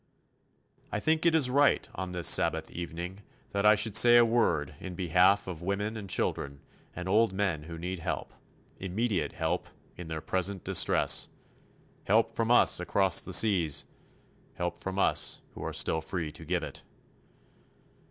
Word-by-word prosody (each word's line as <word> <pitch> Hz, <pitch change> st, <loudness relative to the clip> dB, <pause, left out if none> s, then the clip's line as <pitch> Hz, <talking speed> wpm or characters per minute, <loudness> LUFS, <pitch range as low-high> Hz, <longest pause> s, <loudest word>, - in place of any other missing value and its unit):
I 105 Hz, -, -2 dB
think 160 Hz, +7 st, +1 dB
it 165 Hz, -, +3 dB
is 135 Hz, -6 st, +4 dB
right 140 Hz, +2 st, +2 dB
on 95 Hz, -1 st, -6 dB
this 90 Hz, -2 st, -2 dB
Sabbath 80 Hz, +1 st, +3 dB
evening 85 Hz, +2 st, -7 dB, 0.3 s
that 100 Hz, +1 st, +1 dB
I 105 Hz, -, +7 dB
should 105 Hz, 0 st, 0 dB
say 120 Hz, +1 st, +7 dB
a 120 Hz, -, +6 dB
word 85 Hz, -, 0 dB
in 95 Hz, -2 st, -8 dB
behalf 90 Hz, +3 st, +2 dB
of 90 Hz, -3 st, -7 dB
women 100 Hz, +4 st, -3 dB
and 100 Hz, -3 st, -8 dB
children 70 Hz, -5 st, -2 dB, 0.3 s
and 90 Hz, +1 st, -6 dB
old 105 Hz, +1 st, +2 dB
men 95 Hz, -6 st, -1 dB
who 85 Hz, 0 st, -8 dB
need 90 Hz, +2 st, -5 dB
help 80 Hz, -, -5 dB, 0.5 s
immediate 95 Hz, -3 st, -2 dB
help 85 Hz, +2 st, -3 dB, 0.3 s
in 90 Hz, -, -8 dB
their 80 Hz, -1 st, -5 dB
present 95 Hz, +3 st, -2 dB
distress -, -, +2 dB, 0.8 s
help 115 Hz, +3 st, +2 dB
from 115 Hz, 0 st, -1 dB
us 120 Hz, -, +4 dB
across 95 Hz, +1 st, +2 dB
the -, -, -8 dB
seas, 85 Hz, -10 st, +3 dB, 0.7 s
help 85 Hz, 0 st, -4 dB
from 95 Hz, 0 st, -5 dB
us -, -, +1 dB
who -, -, -9 dB
are -, -, -4 dB
still 80 Hz, -, 0 dB
free 80 Hz, -2 st, -4 dB
to 80 Hz, +1 st, -11 dB
give 85 Hz, 0 st, -2 dB
it. -, -, -8 dB
95 Hz, 160 wpm, -28 LUFS, 85-105 Hz, 0.8 s, I